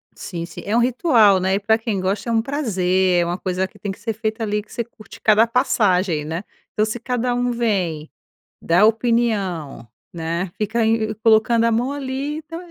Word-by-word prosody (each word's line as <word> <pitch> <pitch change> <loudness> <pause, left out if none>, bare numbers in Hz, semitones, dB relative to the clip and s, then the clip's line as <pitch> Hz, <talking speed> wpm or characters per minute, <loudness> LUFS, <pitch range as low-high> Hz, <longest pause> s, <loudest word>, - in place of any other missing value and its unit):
Sim, 170 -3 -6
sim. 170 - -10
É 210 - -1
um 235 - +4
ritual, 240 - +4
né, 190 +1 +1
e - - 0
pra 220 +2 +2
quem 220 -4 -3
gosta 195 +5 -2
é - - 0
um 225 - +3
prazer, 190 -9 +1
é - - 0
uma 175 +1 -2
coisa 185 0 -2
que 205 +1 -21
tem 200 - -4
que 195 - -10
ser 225 +1 -3
feita 220 +1 -3
ali, 210 0 -1
que - - -22
você 235 - -3
curte 220 -2 -15
cada 220 +1 +5
passagem, 185 -9 +1
né, 165 +5 -4 0.3
então 215 - +2
se 220 +2 -4
cada 245 0 -1 0.2
vem 185 -10 -1 0.5
dá 175 +5 +4
opinião, 215 - 0 0.2
né. 170 +2 -3
Fica 220 +2 -1
ainda 220 -1 +1
colocando 225 +1 +4
a 230 - +2
mão 245 +4 0
ali 280 +2 -4
então 320 +2 -8
215 Hz, 200 wpm, -21 LUFS, 185-235 Hz, 0.5 s, cada